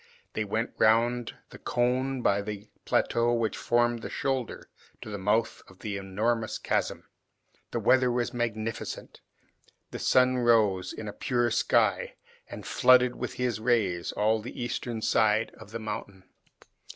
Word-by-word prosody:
They 110 - -2
went 110 +3 -2
round 120 +2 +2 0.2
the - - -11
cone 125 +1 0
by 100 0 +3
the 105 0 -6 0.2
plateau 120 +1 +2
which 115 -2 -1
formed 120 -1 +1
the - - -6
shoulder, 135 -4 -3 0.4
to 110 - -8
the 100 - -4
mouth 105 +4 0
of 95 - -17
the 100 +1 -5
enormous 110 +4 -1
chasm. - - -1 0.7
The - - -2
weather 130 -1 +4
was 120 0 -1
magnificent. 115 -2 -4 0.7
The - - -6
sun 130 0 +3
rose 105 -6 +3
in 110 - -7
a 105 - -5
pure 120 0 0
sky - - +1 0.3
and - - -8
flooded 125 -1 +4
with - - -4
his 125 -4 -1
rays 110 -7 +1
all 110 +1 +1
the 120 +4 -8
eastern 120 -1 -3
side 110 0 +2
of - - -12
the 115 - -5
mountain. 105 -3 -6
115 Hz, 150 wpm, -28 LUFS, 105-120 Hz, 0.7 s, weather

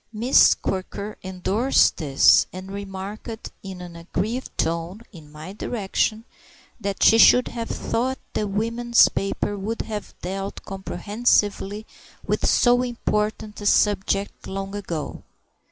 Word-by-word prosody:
Miss 235 +4 +5
Quirker 195 +2 -5
endorsed 190 +7 +2
this, 140 -4 +5
and 185 +1 -8
remarked 200 +3 -7
in 190 -2 -8
an 175 -1 -9
aggrieved 200 +9 -3
tone 170 +5 -2
(in 155 -6 -14
my 155 +5 -9
direction) 215 +1 -2 0.5
that 200 0 -2
she 225 - +6
should 250 +2 +7
have 230 -1 -5
thought 260 +3 -1 0.2
the 210 - -1
women's 230 +4 +3
papers 195 +1 -2
would 220 +4 -3
have 210 -2 -6
dealt 195 +2 -5
comprehensively 205 +1 0 0.4
with - - 0
so 245 0 +4
important 215 -3 -2
a 205 - -1
subject 200 -1 +1
long 195 0 -5
ago. 175 -7 -5
205 Hz, 120 wpm, -23 LUFS, 190-225 Hz, 0.5 s, should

